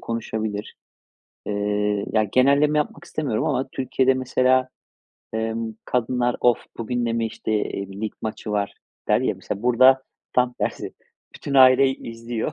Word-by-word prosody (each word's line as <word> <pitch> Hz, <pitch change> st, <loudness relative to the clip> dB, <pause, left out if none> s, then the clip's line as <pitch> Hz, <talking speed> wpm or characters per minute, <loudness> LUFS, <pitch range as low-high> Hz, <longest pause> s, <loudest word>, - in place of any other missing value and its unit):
konuşabilir. 110 Hz, -2 st, -4 dB, 0.7 s
Eee, 105 Hz, 0 st, 0 dB
ya, 110 Hz, -1 st, +3 dB
genelleme 140 Hz, +7 st, +3 dB
yapmak 150 Hz, +1 st, -3 dB
istemiyorum 145 Hz, -10 st, -2 dB
ama 135 Hz, +1 st, 0 dB
Türkiye'de 130 Hz, 0 st, +1 dB
mesela, 130 Hz, 0 st, +2 dB, 0.7 s
emm, 110 Hz, 0 st, -2 dB
kadınlar, 125 Hz, 0 st, 0 dB
"Of! 120 Hz, -2 st, +4 dB, 0.2 s
Bugün 120 Hz, +1 st, -2 dB
de 115 Hz, -, 0 dB
mi, 115 Hz, -1 st, 0 dB
işte, 110 Hz, -, -4 dB
eee, 100 Hz, -2 st, -2 dB
lig 110 Hz, -1 st, -3 dB
maçı 110 Hz, 0 st, -5 dB
var?" 100 Hz, -1 st, -1 dB, 0.3 s
der, -, -, +4 dB
ya. -, -, 0 dB
Mesela, 100 Hz, -, -6 dB
burada 130 Hz, +2 st, +5 dB, 0.3 s
tam 125 Hz, 0 st, +2 dB
tersi, -, -, -4 dB, 0.4 s
bütün 140 Hz, -, -5 dB
aile 130 Hz, 0 st, +7 dB
i 130 Hz, -3 st, -5 dB
izliyor. 115 Hz, +4 st, -4 dB
120 Hz, 145 wpm, -23 LUFS, 110-130 Hz, 0.7 s, aile